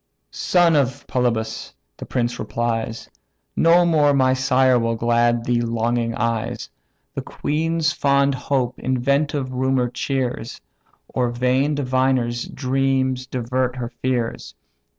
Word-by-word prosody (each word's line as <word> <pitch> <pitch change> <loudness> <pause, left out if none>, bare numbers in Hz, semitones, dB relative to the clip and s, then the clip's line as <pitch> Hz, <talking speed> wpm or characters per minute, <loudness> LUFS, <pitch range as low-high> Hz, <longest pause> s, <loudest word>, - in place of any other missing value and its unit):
"Oh - - -53
son 175 -3 +3
of 135 -3 0
Polybus!" 115 -3 -2 0.2
the - - -8
prince 120 -1 -1
replies, 115 -1 -3 0.5
"No 170 +1 +5
more 150 -4 +3
my 130 -1 +3
sire 130 -1 +3
will 115 0 0
glad 120 0 +1
these 120 -1 +1
longing 115 0 -1
eyes; 115 0 -2 0.4
The - - -3
queen's 160 +1 -1
fond 140 0 +2
hope 130 -1 -1
inventive 140 +2 0
rumour 130 -1 +1
cheers, 125 -2 -3 0.5
Or 125 -1 -1
vain 130 +4 +1
diviners' 130 -3 0
dreams 130 -1 0
divert 125 0 -1
her 120 -2 -4
fears. 120 - -3
130 Hz, 120 wpm, -21 LUFS, 120-135 Hz, 0.5 s, No